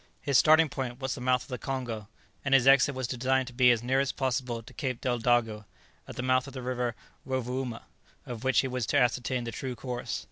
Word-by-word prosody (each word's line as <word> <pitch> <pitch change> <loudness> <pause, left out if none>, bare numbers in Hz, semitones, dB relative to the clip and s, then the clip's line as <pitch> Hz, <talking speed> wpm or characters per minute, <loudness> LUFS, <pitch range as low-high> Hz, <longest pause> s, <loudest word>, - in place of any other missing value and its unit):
His 140 - -2
starting 155 +4 +6
point 130 -3 -5
was 130 -1 -2
the - - -7
mouth 125 0 +2
of - - -18
the 125 -2 -4
Congo, 120 -6 -4 0.4
and 135 -1 +3
his 130 -2 +4
exit 140 +1 +5
was 130 -1 -2
designed 130 +2 0
to - - -14
be 125 0 +5
as 120 -1 +3
near 130 +2 +1
as 135 -1 +1
possible 125 -3 -2
to 125 +3 -14
Cape 130 -4 -3
Deldago, 120 -3 0 0.4
at - - -9
the 125 - -4
mouth 130 +1 +2
of 135 - -10
the 130 -2 -6
River 125 -2 -2 0.3
Rovouma, 130 -2 -3 0.4
of 120 -1 -7
which 130 -2 +3
he 135 - -3
was 125 -3 -3
to - - +2
ascertain 125 0 +1
the 115 - -5
true 130 +1 -5
course. 125 0 -4
125 Hz, 225 wpm, -28 LUFS, 120-130 Hz, 0.4 s, starting